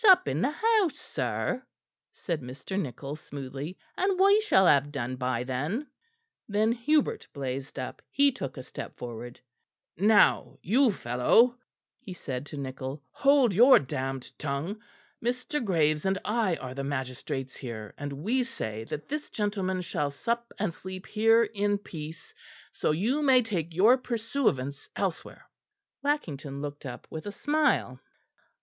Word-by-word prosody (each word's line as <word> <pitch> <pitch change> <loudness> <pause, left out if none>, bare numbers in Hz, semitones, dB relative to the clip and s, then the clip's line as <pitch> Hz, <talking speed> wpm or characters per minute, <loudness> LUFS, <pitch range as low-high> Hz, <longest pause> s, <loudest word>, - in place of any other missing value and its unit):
"Sup 370 -3 +7
in - - 0
the 255 - +3
house, 425 +1 +2
sir," 255 - -2 0.5
said 165 -5 -3
Mr. 130 +9 -7
Nichol 140 - -4
smoothly, 145 +2 -7 0.2
"and 380 0 +1
we 400 +2 +6
shall 305 - +4
have 145 -3 +4
done 130 -3 -3
by 125 -1 -1
then." 145 - -2 0.6
Then 215 +2 +3
Hubert 300 - +1
blazed 135 0 -4
up; 130 -1 -5
he 280 0 +4
took 140 - -6
a 130 - -6
step - - -8
forward. 120 0 -7 0.6
"Now, 205 +4 +4
you 245 +6 +4
fellow," 190 - +3 0.4
he 190 - -8
said 135 -5 -5
to 145 - -7
Nichol, 135 +1 -5
"hold 275 -6 +4
your 245 +7 +8
damned 135 -1 -3
tongue. 150 +9 -3 0.4
Mr. 250 +4 -1
Graves 155 -6 +2
and 190 0 +1
I 210 -5 +1
are 130 -4 -7
the 135 +1 -4
magistrates 130 -1 -4
here, 110 -5 -7
and 145 0 -5
we 205 - 0
say 110 - -4
that 145 - -6
this 300 +1 -4
gentleman 195 -3 -1
shall 165 -5 -1
sup 235 +11 -2
and 195 -4 -1
sleep 185 +2 -8
here 225 +2 +4
in 205 -2 0
peace, 160 -5 -9 0.4
so - - -1
you 220 - +1
may 260 -3 +5
take 170 -7 -3
your 225 +8 +6
pursuivants 225 - -1
elsewhere." 190 -4 -3 0.6
Lackington 150 - -2
looked 145 0 -6
up 125 - -8
with 160 +5 -6
a - - -3
smile. 290 - +1
180 Hz, 145 wpm, -28 LUFS, -, 0.6 s, your